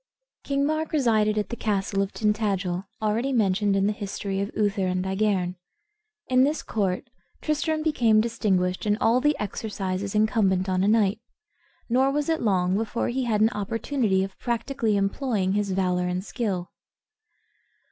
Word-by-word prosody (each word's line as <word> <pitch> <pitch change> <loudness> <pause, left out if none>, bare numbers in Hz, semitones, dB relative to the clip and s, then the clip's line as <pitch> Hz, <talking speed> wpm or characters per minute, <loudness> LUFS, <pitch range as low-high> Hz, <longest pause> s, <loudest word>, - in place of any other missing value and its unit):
King 280 0 0
Mark 310 +1 -1
resided 220 -7 +2
at 210 - -1
the 235 - -3
castle 200 -3 -1
of 195 0 -2
Tintadel, 200 -4 -1 0.2
already 225 +6 0
mentioned 205 -4 +2
in 195 0 +2
the 210 - +1
history 200 -1 -4
of 200 - -2
Uther 205 -3 +1
and 185 0 -1
Igerne. 190 -2 0 0.7
In 255 0 +4
this 295 +3 0
court 195 -3 -1 0.4
Tristram 310 +1 0
became 235 -9 +3
distinguished 200 -5 0
in 210 0 +2
all 240 +2 +3
the 295 +2 +2
exercises 200 -1 -3
incumbent 210 -3 +2
on 185 0 +1
a - - +2
knight; 210 -2 +3 0.7
nor 260 +3 +3
was 295 +2 -1
it 325 0 +1
long 185 -4 +2
before 225 +2 -1
he 255 +1 -1
had 215 -3 +1
an 220 +2 +4
opportunity 215 -1 0
of 195 0 -7
practically 235 -2 -1
employing 195 -1 0
his 205 0 0
valor 180 -1 0
and 180 +2 -2
skill. 195 -8 -3
210 Hz, 155 wpm, -25 LUFS, 190-235 Hz, 0.7 s, In